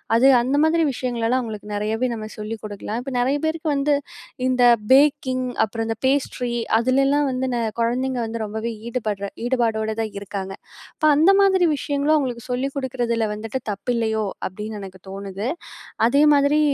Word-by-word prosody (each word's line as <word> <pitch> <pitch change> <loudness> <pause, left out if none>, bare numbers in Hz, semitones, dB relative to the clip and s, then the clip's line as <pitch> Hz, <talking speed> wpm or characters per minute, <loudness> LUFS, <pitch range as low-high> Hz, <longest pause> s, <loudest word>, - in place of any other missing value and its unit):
அது 245 +4 +5
அந்த 260 +4 0
மாதிரி 330 +1 +3
விஷயங்கள்ளலாம் 245 0 0
அவங்களுக்கு 210 -3 -7
நெறயாவே 220 +4 -1
நம்ம 215 -1 -6
சொல்லிக் 215 +1 -5
குடுக்கலாம். 210 +2 -5
இப்ப 270 0 -6
நெறய 265 +4 +2
பேருக்கு 315 0 -1
வந்து, 285 +1 +2 0.5
இந்த 255 -1 +1 0.3
பேக்கிங், 265 -2 +3 0.2
அப்புறம் 225 +1 -4
இந்த 225 - -2
பேஸ்ட்ரி 260 -3 0 0.3
அதுலலாம் 275 +4 +2
வந்து 255 0 -1
ந - - 0 0.2
கொழந்தைங்க 250 +2 0
வந்து 225 0 -4
ரொம்பவே 220 +2 -4 0.2
ஈடுபடுற 215 -5 -2 0.2
ஈடுபாடோடு 225 -3 0
தான் 220 -2 -4
இருக்காங்க. 195 -1 -5 0.4
அப்ப 310 - -1
அந்த 325 +6 +6
மாதிரி 380 -2 +4
விஷயங்களும், 285 +2 +1
அவங்களுக்கு 250 -5 -2
சொல்லிக் 265 +2 -1
குடுக்குறதில 245 -4 -1
வந்துட்டு, 225 +4 -4
தப்பில்லையோ 220 +1 -1 0.2
அப்டின்னு 210 +3 -7
எனக்கு 190 -1 -10
தோணுது. 195 +2 -5 0.6
அதே 275 +5 +4
மாதிரி, 285 +1 +3
240 Hz, 150 wpm, -22 LUFS, 220-275 Hz, 0.6 s, அந்த